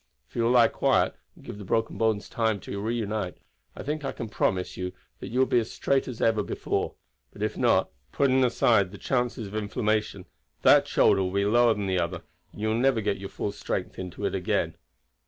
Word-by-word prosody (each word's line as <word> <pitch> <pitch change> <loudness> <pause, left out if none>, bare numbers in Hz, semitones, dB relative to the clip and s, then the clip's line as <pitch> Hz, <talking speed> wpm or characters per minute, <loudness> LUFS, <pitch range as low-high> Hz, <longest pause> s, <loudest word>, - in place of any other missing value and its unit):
If - - -28
you 120 - 0
will - - +3
lie 120 -1 +6
quiet, - - +2 0.2
and - - -17
give 100 - -8
the - - -7
broken 115 +3 0
bones 110 -3 0
time 110 -3 0
to 100 +2 -5
reunite, 110 -4 -2 0.4
I - - -7
think 150 +1 -3
I 135 - -2
can 115 - -6
promise 95 -3 -1
you 90 0 -4 0.3
that - - -7
you 125 - -4
will 130 - +5
be 125 - +3
as 115 - -3
straight 135 -1 0
as 125 -3 -6
before; 110 -3 0 0.4
but - - -6
if - - -1
not - - +2 0.2
putting 130 -1 +3
aside 115 -5 +3
the 100 - -10
chances 125 -2 -1
of 100 - -9
inflammation 110 0 -1 0.4
that - - +6
shoulder 95 - +4
will 90 -1 -1
be 100 +1 +1
lower 120 +2 +4
than 105 - -3
the 95 -1 +1
other, 85 0 -2 0.3
and - - -11
you 110 - +1
will 110 - +1
never 130 -2 +3
get 105 -2 -1
your 95 0 -6
full 100 - -3
strength 100 -2 -4
in 90 -1 -5
it - - -1
again. 95 -2 0
110 Hz, 215 wpm, -27 LUFS, 100-120 Hz, 0.4 s, lie